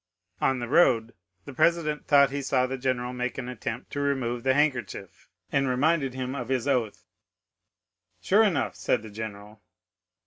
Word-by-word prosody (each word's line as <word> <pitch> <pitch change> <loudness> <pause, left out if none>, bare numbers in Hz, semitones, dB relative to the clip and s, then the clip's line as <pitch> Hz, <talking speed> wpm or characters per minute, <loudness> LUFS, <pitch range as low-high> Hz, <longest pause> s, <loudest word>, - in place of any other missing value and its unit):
On 135 - +2
the 120 -1 -4
road 120 -6 +3 0.3
the 140 - -9
president 155 +1 +1
thought 140 -2 +5
he 140 0 -3
saw 130 -1 +1
the 130 +1 -3
general 125 -1 -2
make 125 -1 -3
an 130 -2 -5
attempt 120 0 -6
to 145 - -4
remove 130 -4 -1
the 130 +1 +2
handkerchief, 120 - -2 0.2
and 140 -1 +1
reminded 135 +1 +1
him 130 0 -3
of 125 -3 -5
his 130 0 -1
oath. 125 -6 -1 1.1
"Sure 205 +3 +3
enough," 185 -11 +1
said 120 - 0
the 110 - -10
general. 105 0 -8
130 Hz, 165 wpm, -26 LUFS, 120-140 Hz, 1.1 s, thought